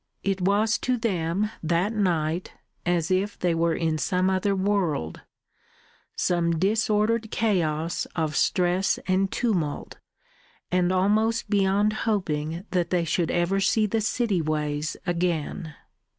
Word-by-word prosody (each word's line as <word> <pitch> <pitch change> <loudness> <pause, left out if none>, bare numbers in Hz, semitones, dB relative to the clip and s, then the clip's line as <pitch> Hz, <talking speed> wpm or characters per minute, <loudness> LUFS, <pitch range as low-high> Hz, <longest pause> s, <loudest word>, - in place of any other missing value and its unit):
It 195 -1 -1
was 210 +4 +2
to 255 0 0
them 200 -2 -1
that 175 +6 0
night 175 -4 -1 0.3
as 175 -1 +1
if 195 +2 0
they 175 -2 +1
were 165 0 +1
in 160 -2 -1
some 185 +6 +1
other 195 +1 +1
world, 185 - -1 0.9
some 170 -2 +1
disordered 215 +3 +1
chaos 170 -8 0
of 155 -3 -1
stress 180 +3 +2
and 190 +1 +1
tumult, 180 -12 -2 0.7
and 180 0 +2
almost 215 +4 +1
beyond 200 +1 +2 0.2
hoping 165 -3 -2
that 175 -2 0
they 175 -2 +1
should 165 +1 0
ever 175 +3 +1
see 215 +3 +2
the 220 +2 0
city 215 -4 0
ways 150 -1 -2
again. 170 -2 -2
185 Hz, 125 wpm, -25 LUFS, 165-205 Hz, 0.9 s, was